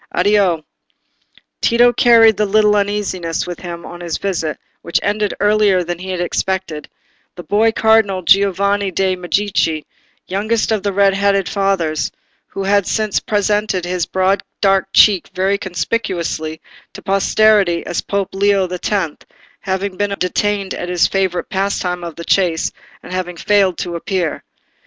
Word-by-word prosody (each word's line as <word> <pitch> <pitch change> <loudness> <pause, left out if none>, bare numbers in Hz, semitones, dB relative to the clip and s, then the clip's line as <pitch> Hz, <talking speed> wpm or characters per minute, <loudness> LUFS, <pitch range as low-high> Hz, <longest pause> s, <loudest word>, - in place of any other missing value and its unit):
Addio." 185 -4 +2 1.0
Tito 240 +1 +4
carried 225 -4 +5
a 210 - +3
little 210 +1 +3
uneasiness 200 -5 -1
with 175 -1 -7
him 170 -1 -7
on 175 0 -9
his 170 -2 -3
visit, 165 -6 -2 0.2
which 170 - 0
ended 205 0 -1
earlier 205 -3 +3
than 175 0 -5
he 190 +1 -7
had 185 -1 -3
expected, 175 -3 -3 0.5
the 175 - -9
boy 215 +4 +2
cardinal 220 -4 +2
Giovanni 200 +1 +2
de' 190 +1 0
Medici, 180 -4 -1 0.4
youngest 215 +4 -1
of 215 -3 0
red 200 0 +3
hatted 200 -1 +1
fathers, 185 -7 -1 0.4
who 195 - -5
has 200 -1 +1
since 215 -2 0
presented 205 -3 0
his 180 -1 -2
broad 190 +1 +1 0.2
dark 195 -1 +2
cheek 200 -5 +4
very 195 +2 +1
conspicuously 175 -5 -3 0.3
to - - -11
posterity 195 -2 +2
as 175 - -2
Pope 200 -1 -2
Leo 200 0 +2
the 180 0 -5
Tenth, 185 -7 -2 0.4
having 190 0 -3
been 205 -1 -1
detained 195 +2 -1
at 175 - -5
his 180 -1 +2
favourite 190 -2 -1
pastime 190 -3 -2
of 170 -2 -7
the 170 - -8
chase, 175 -4 +1 0.3
and - - -9
having 180 -1 -4
failed 195 -1 +2
to 175 -1 -4
appear. 175 -1 -2
195 Hz, 145 wpm, -17 LUFS, 180-205 Hz, 1.0 s, carried